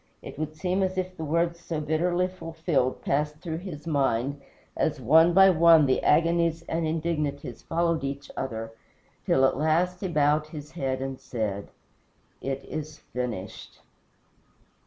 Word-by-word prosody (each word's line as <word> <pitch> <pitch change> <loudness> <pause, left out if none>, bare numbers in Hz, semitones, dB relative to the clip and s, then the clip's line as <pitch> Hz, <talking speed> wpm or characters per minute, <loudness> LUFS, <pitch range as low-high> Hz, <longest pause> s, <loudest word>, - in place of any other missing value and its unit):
It - - -9
would 155 0 -3
seem 180 +3 -1
as 190 0 -1
if 185 0 -2
the 160 - -6
words 170 +2 0
so 165 -2 -4
bitterly 175 +4 +1
fulfilled 165 -7 -2
passed 150 +2 0
through 160 0 -5
his 170 -5 -8
mind, 140 -2 0 0.3
as 150 -2 0
one 160 +7 +5
by 190 +1 +7
one 165 -2 +6
the 130 - +2
agonies 165 +1 +2
and 165 -1 -2
indignities 150 -6 -2
followed 165 -2 0
each 140 +1 -5
other, 115 -4 -4 0.6
till 135 - +4
at 130 - +1
last 170 +4 +1
he 195 - -1
bowed 150 -2 +2
his 150 -1 -9
head 135 -5 -2
and 135 -1 -5
said, 105 -4 -4 0.7
"It 135 0 -4
is 155 0 -6
finished." 125 -7 -6
155 Hz, 150 wpm, -27 LUFS, 140-170 Hz, 0.7 s, by